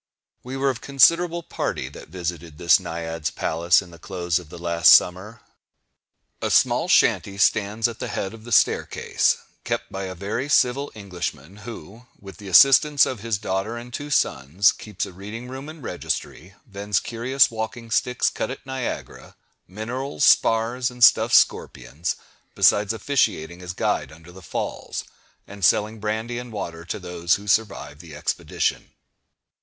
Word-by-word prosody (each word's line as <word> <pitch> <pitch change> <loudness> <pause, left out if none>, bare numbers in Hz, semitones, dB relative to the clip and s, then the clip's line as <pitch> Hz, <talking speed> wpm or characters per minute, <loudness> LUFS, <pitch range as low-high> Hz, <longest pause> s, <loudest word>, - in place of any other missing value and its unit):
We 130 +2 -6
were 135 0 +2
of 125 - -7
a - - -19
considerable 170 +5 +3
party - - -3
that - - -12
visited 85 -3 -6
this 85 +4 +5
Naiad's 80 -3 -4
palace 85 +5 +1
in 90 - -15
the 85 - -14
close 90 -1 -2
of 85 -4 -14
the 85 - -10
last 85 0 +4
summer. 105 +5 +2 1.0
A - - -1
small - - +3
shanty 100 -1 +3
stands 105 +2 +2
at 120 -1 -8
the - - -4
head 95 - -4
of 110 -1 -12
the 120 - -10
staircase, 105 - +2 0.3
kept - - -3
by 95 0 -4
a 95 0 -6
very 105 +9 -4
civil 140 0 +2
Englishman, 90 -4 -6
who, 115 +1 -11
with 95 -3 -12
the 100 -1 -11
assistance 135 - +6
of 130 - -4
his 115 -1 -2
daughter 100 +3 -3
and 120 +1 -10
two 145 +3 -5
sons, 85 - +2
keeps 105 - -5
a - - -11
reading 105 +6 -8
room 135 +3 -8
and 155 -3 -11
registry, 95 -4 -5
vends 100 -3 -2
curious 120 +3 +1
walking 115 +1 -6
sticks 125 +1 +1
cut - - -3
at 130 - -8
Niagara, 130 -2 -6 0.3
minerals, 125 - -4
spars, 120 +1 +3
and 125 -1 -3
stuffed - - +6
scorpions, 65 +7 +1 0.4
besides 105 0 +4
officiating 95 - -1
as 90 0 -6
guide - - -1
under 80 +2 -15
the 95 +1 -13
Falls, - - -5 0.4
and 100 -1 -11
selling 110 +5 +2
brandy 110 +3 -3
and 125 -1 -9
water 85 -6 -6
to - - -4
those 90 -2 0
who 100 - -9
survive 100 -8 -1
the 80 -3 -11
expedition. 75 - -2
105 Hz, 160 wpm, -23 LUFS, 90-120 Hz, 1.0 s, assistance